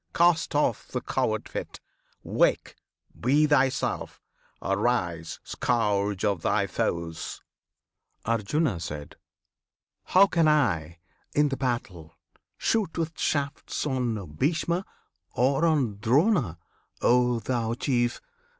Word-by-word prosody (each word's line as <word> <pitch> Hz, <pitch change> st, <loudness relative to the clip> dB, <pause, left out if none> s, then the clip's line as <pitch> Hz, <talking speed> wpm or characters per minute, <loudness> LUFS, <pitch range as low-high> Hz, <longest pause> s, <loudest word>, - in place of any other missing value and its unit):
cast 170 Hz, -3 st, +3 dB
off 145 Hz, -7 st, +1 dB
the -, -, -3 dB
coward -, -, -1 dB
fit! -, -, -6 dB, 0.4 s
Wake! -, -, +1 dB, 0.4 s
Be 145 Hz, +5 st, +3 dB
thyself! 135 Hz, -3 st, +1 dB, 0.4 s
Arise, 95 Hz, -6 st, -1 dB
Scourge 105 Hz, -4 st, 0 dB
of 100 Hz, -5 st, 0 dB
thy -, -, +1 dB
Foes! 85 Hz, -1 st, -3 dB, 0.8 s
Arjuna. 115 Hz, -, 0 dB, 1.3 s
How 190 Hz, +2 st, +6 dB
can 170 Hz, -5 st, +2 dB
I, 85 Hz, -, +1 dB, 0.4 s
in 150 Hz, 0 st, +4 dB
the 135 Hz, -, -1 dB
battle, 95 Hz, -, -3 dB, 0.4 s
shoot 210 Hz, -8 st, 0 dB
with 165 Hz, -1 st, -1 dB
shafts 145 Hz, 0 st, -1 dB
On 125 Hz, -7 st, -1 dB
Bhishma, 170 Hz, -, 0 dB, 0.5 s
or 135 Hz, +6 st, +2 dB
on 130 Hz, -11 st, +1 dB
Drona 130 Hz, -, +2 dB, 0.5 s
O 125 Hz, 0 st, +4 dB
thou 115 Hz, 0 st, -1 dB
Chief! 120 Hz, -1 st, 0 dB
125 Hz, 100 wpm, -27 LUFS, 100-150 Hz, 1.3 s, How